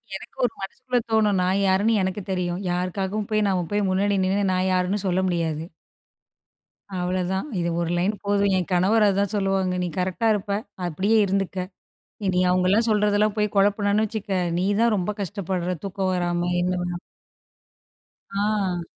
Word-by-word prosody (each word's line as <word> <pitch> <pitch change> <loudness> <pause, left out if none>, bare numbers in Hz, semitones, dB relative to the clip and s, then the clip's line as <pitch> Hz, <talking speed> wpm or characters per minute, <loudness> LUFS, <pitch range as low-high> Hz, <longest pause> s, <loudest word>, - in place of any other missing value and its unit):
எனக்கு 195 - -10
ஒரு 245 - -1
மனசுக்குள்ள 250 +5 -2
தோணும். 210 -3 +3
"நான் 185 +2 +1
யாருன்னு 200 +4 +3
எனக்கு 190 +2 -2
தெரியும். 180 0 -2
யாருக்காகவும் 190 +3 -2
போய் 215 -1 +2
நம்ம 180 -3 0
போய் 205 -1 +1
முன்னாடி 200 +2 +1
நின்னு 195 0 +1
நான் 185 +1 +1
யாருன்னு 185 +2 +1
சொல்ல 185 0 +1
முடியாது." 165 -3 -1 1.4
அவ்வளோதான். 185 +5 -1
இது 170 0 0
ஒரு 170 - -1
லைன் 195 +5 +1
போதும், 200 -1 +2
"என் 180 - -1
கணவர் 205 +5 +4
அதான் 200 0 +1
சொல்லுவாங்க, 195 -2 +1
நீ - - -1
கரெக்ட்டா 185 +5 0
இருப்ப, 205 -1 -2 0.3
அப்படியே 195 +7 +1
இருந்துக்க. 190 -1 -1 0.6
இனி 180 -1 +2
அவங்களலாம் 185 +5 +3
சொல்றதெல்லாம் 210 0 +2
போய் 210 -1 0
குழப்புனன்னு 205 +1 +3
வச்சுக்க, 215 -1 -5 0.3
நீ 180 - +1 0.2
தான் 235 -1 +4
ரொம்ப 190 +2 -1
கஷ்டப்படுற, 185 -2 -2
தூக்கம் 195 -1 -1
வராம," 175 0 0
என்ன 180 +1 0 1.6
ஆ. 200 -3 0
195 Hz, 145 wpm, -24 LUFS, 180-205 Hz, 1.6 s, கணவர்